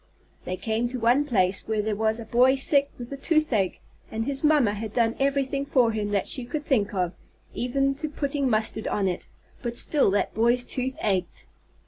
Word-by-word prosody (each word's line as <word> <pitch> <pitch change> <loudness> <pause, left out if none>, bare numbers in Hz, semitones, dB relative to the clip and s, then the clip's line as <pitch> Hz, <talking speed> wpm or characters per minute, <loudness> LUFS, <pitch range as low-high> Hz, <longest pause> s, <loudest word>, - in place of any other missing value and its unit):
They 185 - -3
came 225 +3 -1
to 255 0 -4
one 245 +6 +3
place 195 -7 +1
where 215 -1 0
there 215 0 -1
was 220 +2 0
a 230 - -7
boy 250 +4 +4
sick 280 +1 +3
with 240 +1 -8
the 275 - -5
toothache, 275 - +1 0.3
and 225 +1 -3
his 275 +2 -2
mamma 295 -9 +4
had 215 0 -5
done 230 -1 +2
everything 275 0 0
for 255 -5 +2
him 210 -2 -2
that 200 -2 0
she 260 - +2
could 295 +5 -5
think 215 -8 +1
of, 180 -1 -1 0.4
even 275 +3 0
to 310 +1 -2
putting 280 -2 -1
mustard 220 -1 0
on 200 -2 0
it, 180 -1 -3 0.3
but 235 -1 -3
still 290 -8 +3
that 200 +1 0
boy's 235 +3 +3
tooth 260 +1 -2
ached. 190 -5 -1
240 Hz, 195 wpm, -25 LUFS, 215-275 Hz, 0.4 s, boy